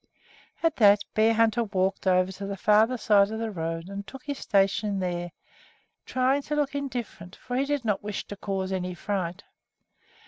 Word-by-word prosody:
At 330 -2 +2
that, 205 -2 +6
Bearhunter 225 +1 +3
walked 195 -2 -1
over 185 0 +3
to 195 +1 -7
the 200 0 -4
farther 215 +6 +4
side 205 -3 +4
of 220 - -4
the 225 -1 -3
road 165 -2 -4
and 200 0 -7
took 270 +6 -10
his 285 -2 -4
station 200 0 +1
there, 175 -2 -3 0.8
trying 260 +2 +2
to 300 +2 -3
look 290 -2 0
indifferent, 240 -10 -5
for 245 - -6
he 270 +2 +1
did 285 -3 -2
not 210 -3 0
wish 205 -1 -4
to 205 - -7
cause 195 -1 -3
any 180 -1 -3
fright. 190 -1 -3
205 Hz, 175 wpm, -27 LUFS, 190-240 Hz, 0.8 s, that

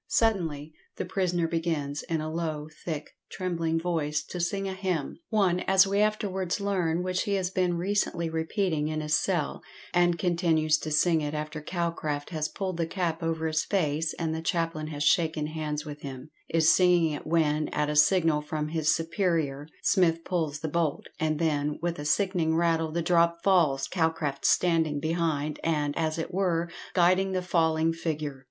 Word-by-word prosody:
Suddenly 160 -9 0 0.2
the - - -2
prisoner 180 -2 0
begins, 160 -4 -2
in 165 -2 -2
a 155 0 -4
low, 155 -3 -3 0.2
thick, 155 -3 -4 0.2
trembling 165 -3 -1
voice, 155 -3 -1
to 180 - -7
sing 195 +3 -1
a 190 - -3
hymn 185 -6 -3
one, 195 -5 +2
as 190 0 +6
we 200 +1 0
afterwards 200 -4 0
learn, 180 -4 0
which 185 0 -1
he 200 - 0
has 185 -2 -1
been 180 -2 +1
recently 180 -2 0
repeating 160 -1 -1
in 155 0 -2
his 150 0 -2
cell 160 0 0 0.3
and 175 -1 +3
continues 160 -3 +2
to 155 - -5
sing 160 +2 +3
it 150 0 -3
after 150 0 -4
Calcraft 155 -3 -3
has 155 -2 -1
pulled 190 -3 -4
the 165 -1 0
cap 170 -2 -2
over 165 -1 -1
his 155 -1 +1
face, 160 -4 0
and 160 -2 -1
the 160 - -3
chaplain 165 -2 -1
has 145 -2 -3
shaken 160 -1 +2
hands 150 -1 -4
with 150 -1 -8
him 135 +1 -8 0.2
is 160 -1 +4
singing 175 -3 +4
it 150 - -6
when, 155 -2 +2
at 150 0 -1
a 150 - -2
signal 160 -1 +4
from 150 0 -3
his 160 -1 +1
superior, 160 -4 -1 0.2
Smith 165 -3 +3
pulls 155 -5 -2
the 160 - -2
bolt, 160 -1 -1
and 155 -1 0
then, 150 -2 0
with 170 -1 -2
a 145 - -5
sickening 170 -1 +1
rattle, 165 -1 +1
the 170 +1 -1
drop 170 0 +2
falls, 155 -9 +3
Calcraft 160 -5 -1
standing 160 -4 +2
behind, 155 -2 -1
and, 150 -3 0
as 160 -1 -1
it 165 +2 -4
were, 175 -3 0 0.2
guiding 185 +2 +3
the 185 -1 -1
falling 165 -2 +2
figure. 155 -4 -3
165 Hz, 175 wpm, -28 LUFS, 155-175 Hz, 0.3 s, as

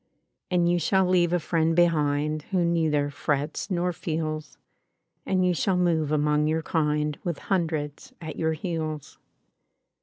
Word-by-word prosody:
|103| 180 - +1
''And 170 -1 +3
you 175 - +2
shall 190 +3 +2
leave 180 -2 +3
a 175 - +3
friend 165 0 +1
behind 155 -3 +2
Who 185 -3 +1
neither 155 -4 +1
frets 145 +4 -2
nor 180 -1 0
feels; 155 -2 -4 0.7
And 185 -1 +2
you 180 - +3
shall 180 +2 +1
mov£ 165 -4 +1
among 150 0 +2
your 160 +1 0
kind 150 -2 0
With 170 -4 -2
hundreds 160 - -2
at 160 -3 -7
your 160 0 0
heels. 155 -3 -4
160 Hz, 150 wpm, -26 LUFS, 150-175 Hz, 0.7 s, And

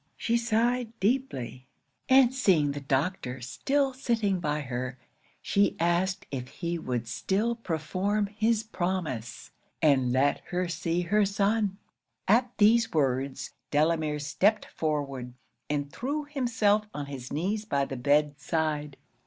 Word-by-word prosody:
She 230 - 0
sighed 235 0 0
deeply; 190 - -1 0.4
and 260 -1 +6
seeing 180 - +3
the 145 - -4
doctor 135 -1 -1
still 270 - 0
sitting 225 -7 0
by 150 -2 -1
her, 125 -1 -4 0.5
she 200 0 +2
asked 175 +3 +1
if 125 -2 -4
he 170 +5 -4
would 125 -5 -3
still 200 - 0
perform 195 +1 -1
his 220 +2 0
promise, 175 - -3 0.3
and 135 -5 +3
let 135 +3 +2
her 180 0 -1
see 170 +1 -1
her 210 +5 +2
son? 200 0 +1 0.5
'At 240 +4 +4
these 225 +2 +5
words, 135 -2 0 0.2
Delamere 155 0 +1
stepped 190 +9 +1
forward, 140 -5 -3 0.4
and 145 -1 -2
threw 285 +4 -2
himself 225 -7 +1
on 145 -1 -3
his 135 -3 -8
knees 195 +8 -1
by 140 -9 +1
the 135 - -5
bed 145 +3 +2
side. 150 -1 -2
170 Hz, 130 wpm, -28 LUFS, 140-215 Hz, 0.5 s, and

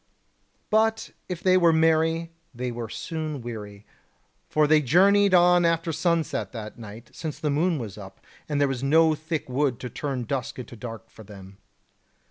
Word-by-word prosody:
But 220 +1 +1 0.2
if 175 -2 -5
they 185 0 +5
were 170 -2 +5
merry, 160 +1 +2 0.2
they 125 +1 -3
were 120 -2 -6
soon 155 +5 -5
weary; 105 -4 -8 0.6
for 155 0 +3
they 155 0 +4
journeyed 195 +7 +4
on 175 0 +5
after 165 0 +1
sunset 170 -3 -1
that 110 -1 -8
night, 110 +1 -11
since 155 -3 -6
the 150 - -1
moon 165 +4 +1
was 110 -6 -7
up, 95 -1 -11 0.3
and 145 -1 0
there 145 - +3
was 135 -2 -3
no 160 +3 +4
thick 155 0 -4
wood 130 -1 0
to 125 - -6
turn 135 -4 -3
dusk 130 +1 -4
into 125 -1 -8
dark 115 0 -9
for 110 - -13
them. 95 -1 -13
150 Hz, 170 wpm, -25 LUFS, 120-165 Hz, 0.6 s, they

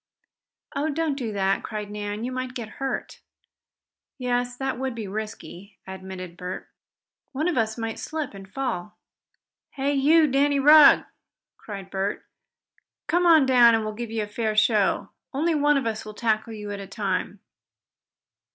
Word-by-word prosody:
"Oh, 290 +3 0
don't 315 0 0
do 250 -5 -4
that!" 195 -1 +1
cried 210 -1 -6
Nan. 210 +1 -4
"You 250 - -3
might 255 0 -4
get 235 -3 -5
hurt." 270 - -4 1.0
"Yes, 245 -1 -1
that 265 -2 -2
would 265 -2 -2
be 220 -3 -5
risky," 205 -1 -7
admitted 190 -2 -8
Bert. 180 0 -6 0.7
"One 300 +5 -1
of 355 - 0
us 220 -1 0
might 225 -1 -4
slip 310 -6 -4
and 195 -1 -11
fall. 215 -7 -4 0.8
Hey 280 +1 0
you, 305 +4 +5
Danny 280 0 +2
Rugg!" 300 +1 +8 0.5
cried 195 -3 -9
Bert. 195 +1 -2 0.8
"Come 350 +1 +2
on 320 -4 +7
down, 245 -3 +6
and 225 - 0
we'll 215 - -3
give 235 +1 -6
you 220 -1 -2
a - - -6
fair 215 +1 -2
show. 215 -2 +2 0.3
Only 325 +4 +1
one 295 -1 +3
of 275 - -1
us 220 -1 -2
will 215 -1 -9
tackle 220 0 0
you 210 -1 -6
at 200 - -5
a 195 - -7
time." 195 0 -3
230 Hz, 160 wpm, -25 LUFS, 205-275 Hz, 1.0 s, Rugg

